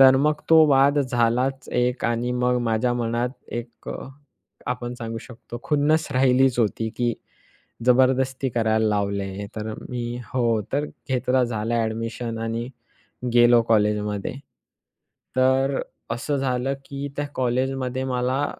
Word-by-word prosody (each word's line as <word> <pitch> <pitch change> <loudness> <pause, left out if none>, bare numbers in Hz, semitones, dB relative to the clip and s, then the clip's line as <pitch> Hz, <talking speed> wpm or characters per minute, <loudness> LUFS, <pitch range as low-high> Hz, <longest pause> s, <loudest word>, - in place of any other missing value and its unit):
तर 130 0 +8
मग 150 +2 +2
तो 160 -1 +8
वाद 140 +1 +5
झालाच 125 0 +1
एक 125 +1 0
आणि 120 +1 0
मग 125 0 +1
माझ्या 115 +1 +1
मनात 120 0 0 0.2
एक 120 0 -7
अ, - - -5 0.7
आपण 125 -1 -3
सांगू 115 -2 -5
शकतो 120 0 -10
खुन्नस 155 +1 +2
राहिलीच 130 -1 +3
होती 110 0 +1
की 120 -1 +1 0.7
जबरदस्ती 130 +1 +3
करायला 110 -2 +1
लावले 100 -1 0
हे. 100 +2 -5
तर 110 0 -4 0.2
मी 120 -1 -3 0.2
हो 115 -3 +2
तर 145 +2 +1 0.2
घेतलं 130 0 +2
झालं 115 -1 -2
ॲडमिशन 115 +1 -2
आणि 115 +1 -3 0.7
गेलो 120 0 +6
कॉलेजमध्ये 105 -2 +1 1.0
तर 130 +1 +3 0.3
असं 135 +5 -1
झालं 135 0 0
की 140 0 -5
त्या 145 - -1
कॉलेजमध्ये 130 +1 -1
मला 130 +2 0
125 Hz, 130 wpm, -24 LUFS, 115-130 Hz, 1.0 s, तर